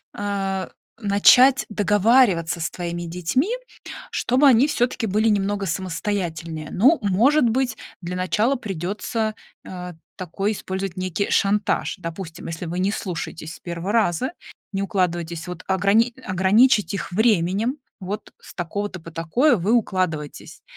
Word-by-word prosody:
а, 195 -2 -2 0.3
начать 245 +6 +6
договариваться 205 -4 +3
с 160 - -1
твоими 175 -1 -5
детьми, 180 - -1 0.6
чтобы 260 +4 +2
они 255 +2 +6
всё-таки 250 -5 0
были 215 +2 +2
немного 200 -1 0
самостоятельнее? 170 -3 -3
Ну, 270 - +4
может 235 +8 +3
быть, 245 -1 0 0.2
для 180 +1 -5
начала 215 +8 +1
придётся, 215 +1 -3 0.3
а, 180 -1 -7 0.2
такой 195 +4 -2
использовать 190 -2 -4
некий 185 +1 -2
шантаж. 205 +1 +1
Допустим, 165 0 -7
если 165 +1 -5
вы 175 +2 -4
не 190 +2 +1
слушаетесь 170 -5 -5
с - - -14
первого 175 +3 -4
раза, 225 - +1 0.4
не 195 0 -1
укладываетесь, 175 -4 -2
вот 180 - -7
ограни 200 +5 +3
ограничить 205 +4 +3
их 195 - -5
временем. 215 - +2 0.2
Вот 200 +2 -6
с - - -14
такого-то 185 +2 -4
по 165 - -10
такое 235 - +2
вы 195 +5 0
укладываетесь, 185 -10 -2
195 Hz, 130 wpm, -22 LUFS, 175-220 Hz, 0.6 s, начать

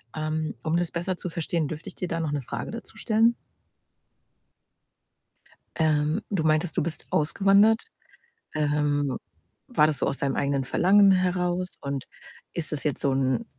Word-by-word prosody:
Ähm, 155 0 -2
um 160 +1 +1
das 175 -2 -1
besser 175 +2 -2
zu 180 - -4
verstehen, 165 -2 -1
dürfte 155 +1 -6
ich - - -11
dir 180 - -3
da 165 0 -2
noch 155 -3 -2
'ne 145 - -1
Frage 125 - -5
dazu 230 - -9
stellen? 225 +2 +3 2.4
Ähm, 155 +3 +2
du 185 -6 0
meintest, 155 +2 +1
du - - +3
bist 155 -3 -3
ausgewandert. 200 - +4 0.7
Ähm, 145 -2 +1 0.5
war 150 - +4
das 155 -2 -1
so - - 0
aus 140 - -1
deinem 135 -1 -1
eigenen 140 -1 0
Verlangen 195 +8 +5
heraus? 180 0 0
Und 140 -1 -4 0.5
ist 165 -2 -3
das 150 -1 -2
jetzt 145 -4 -1
so 140 - +1
'n 130 -2 +1
155 Hz, 160 wpm, -26 LUFS, 145-180 Hz, 2.4 s, Verlangen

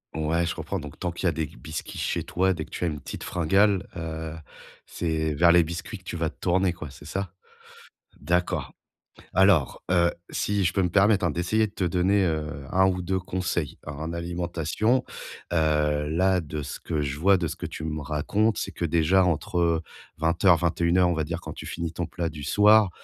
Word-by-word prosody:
Ouais, 80 +2 +1
je 85 -1 -2
comprends. - - -4
Donc, 75 0 -9
tant 90 - -2
qu'il 90 +2 -2
y - - +5
a - - +1
des 80 -2 -2
qu - - -17
biscuits 80 +5 -6
chez - - -1
toi, 95 +1 +1
dès 80 -3 -5
que - - -22
tu - - -4
as - - +2
une 75 -3 -3
petite - - -7
fringale, 95 +3 +2
heu, 80 -1 -5 0.5
c'est 80 -2 -1
vers 85 +3 +6
les 85 -1 +6
biscuits 85 +6 -6
que 90 - -25
tu 90 - -6
vas 80 -1 -1
te - - -31
tourner, 90 0 +2
quoi, 80 -4 -8
c'est 75 - -13
ça? 95 +2 -4 0.9
D'accord. 90 +1 0 0.6
Alors, 95 -7 +4
heu, 85 -1 +4 0.2
si 100 -2 0
je 90 - +1
peux 100 - +2
me 90 - +1
permettre, 100 +1 +4
hein, 85 - +2
d'essayer 100 +7 +1
de 100 - -14
te 95 - -2
donner, 95 +3 +2
heu, 75 -3 -3
1 95 +1 +5
ou 90 -1 -2
2 95 +1 -1
conseils 90 -4 -3
en 75 +2 -5
alimentation. 85 - -1 0.5
Heu, 75 -2 +2
là, 90 +3 +2
de 75 -1 -5
ce - - -7
que 80 -3 -2
je 70 0 -2
vois, 100 +3 +5
de 85 -2 -1
ce - - -5
que - - -6
tu 80 - -6
me 75 -1 -3
racontes, 100 +10 0
c'est 100 - -3
que 85 - -5
déjà 85 +3 +3
entre 85 -1 +1 0.4
20:00-21:00 85 +1 +3
on - - +2
va 80 - -1
dire, 85 +3 -4
quand - - -8
tu - - -9
finis 85 -1 -4
ton 85 - -2
plat 85 -1 -3
du 75 -2 -7
soir, 105 +3 +5
85 Hz, 210 wpm, -26 LUFS, 80-95 Hz, 0.9 s, vers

